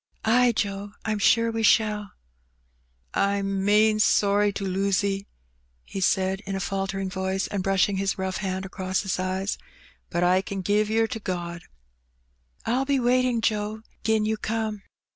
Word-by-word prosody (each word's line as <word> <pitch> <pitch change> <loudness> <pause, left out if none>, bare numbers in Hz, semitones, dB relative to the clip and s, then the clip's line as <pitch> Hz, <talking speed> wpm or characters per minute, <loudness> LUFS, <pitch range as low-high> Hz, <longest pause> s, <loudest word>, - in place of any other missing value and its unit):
" - - -13
Ay, 245 +2 +5
Joe, 200 -1 -3
I*m 215 -1 -1
sure 230 +3 +4
we 225 0 -2
shall. 210 -1 +2 1.0
"I*m 195 -1 0
main 215 +1 +4
sorry 205 -1 +3
to 195 - -4
lose 195 +1 +1
*e, 195 0 -2 0.6
he 195 - -5
said 190 +1 +2
in 195 - -2
a - - -2
faltering 195 0 -2
voice, 190 0 -2
and 200 - -3
brushing 195 +1 +2
his 195 0 -1
rough 190 -1 -2
hand 190 -1 -3
across 185 0 -2
his 190 -2 -2
eyes; 185 +2 -2 0.5
"but 175 - 0
I 180 +1 +4
ken 195 0 -5
give 205 +3 +1
yer 225 +1 +3
to 225 0 -5
God. 175 -3 -4 0.6
" 60 0 -37
1*11 255 +3 0
be 280 -1 +2
waiting, 250 -1 +2
Joe, 215 0 -1 0.2
*gin 220 -1 +2
you 220 0 0
come. 220 -1 -2
200 Hz, 165 wpm, -25 LUFS, 190-215 Hz, 1.0 s, Ay